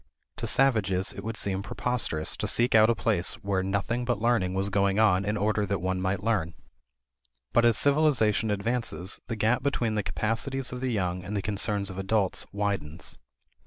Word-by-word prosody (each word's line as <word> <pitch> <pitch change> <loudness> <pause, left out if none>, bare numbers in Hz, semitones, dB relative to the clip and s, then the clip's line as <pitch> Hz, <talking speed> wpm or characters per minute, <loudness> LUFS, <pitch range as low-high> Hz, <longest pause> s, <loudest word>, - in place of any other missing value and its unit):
To - - -3
savages 105 -8 +2
it - - -8
would 115 0 -4
seem 95 -2 -1
preposterous 100 -6 -1
to - - -2
seek 120 +1 +2
out 110 0 +6
a 115 - +3
place 90 -2 0
where 100 -1 0
nothing 100 +6 -1
but 120 -4 -1
learning 110 -5 +1
was 95 +1 0
going 100 0 +1
on 100 -4 +4
in 105 +1 -1
order 105 +1 +1
that 100 +1 0
one 95 +1 -2
might 95 +1 -1
learn. 95 -7 0 1.0
But 120 - +4
as 115 -2 +4
civilization 140 -8 +3
advances, 105 -2 -2
the 115 - -3
gap 110 +3 +1
between 125 -5 0
the 105 - 0
capacities 125 +6 -1
of 125 0 -6
the 130 -1 -1
young 90 -4 -2
and 100 +3 -4
the - - -1
concerns 100 -1 0
of 95 - -7
adults 95 -1 0
widens. 100 -6 -3
105 Hz, 185 wpm, -27 LUFS, 95-115 Hz, 1.0 s, out